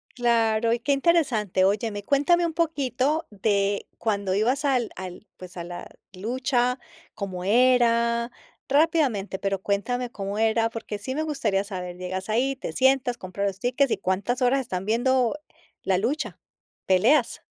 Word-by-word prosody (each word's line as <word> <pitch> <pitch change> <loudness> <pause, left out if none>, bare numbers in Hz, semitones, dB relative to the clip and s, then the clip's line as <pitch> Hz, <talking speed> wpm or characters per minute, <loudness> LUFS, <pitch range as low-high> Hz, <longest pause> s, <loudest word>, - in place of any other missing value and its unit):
Claro, 230 -2 +2
y 235 - 0
que 280 +3 0
interesante. 260 - +2
Óyeme, 205 +1 0
cuéntame 290 - +3
un 335 - -1
poquito, 300 -1 0
de 200 -1 0
cuando 200 -4 -1
ibas 250 +8 +1
al 255 -5 +1
al 185 +2 -8
pues, 185 0 -11
a 170 - -5
la 175 0 -8 0.2
lucha. 245 +5 0 0.4
Cómo 185 -3 -5
era. 235 +1 +3 0.4
Rápidamente, 280 - +2
pero 195 -1 -2
cuéntame 240 +5 -1
cómo 200 0 -5
era, 225 +1 +2
porque 225 -2 -6
sí 240 +6 -5
me 310 - -1
gustaría 235 -11 -1
saber. 180 -3 -6
Llegas 185 +2 -5
ahí, 250 +5 +1
te 270 - -6
sientas, 260 -2 +2
compras 190 +2 -4
los 195 -1 -3
tickets, 255 +2 +1
y - - +2
cuántas 205 +8 -1
horas 265 +2 +3
están 190 -7 -4
viendo 250 +4 +1 0.5
la 190 - +2
lucha, 245 +11 -2 0.5
peleas. 225 +8 +3
230 Hz, 150 wpm, -25 LUFS, 200-260 Hz, 0.5 s, cuéntame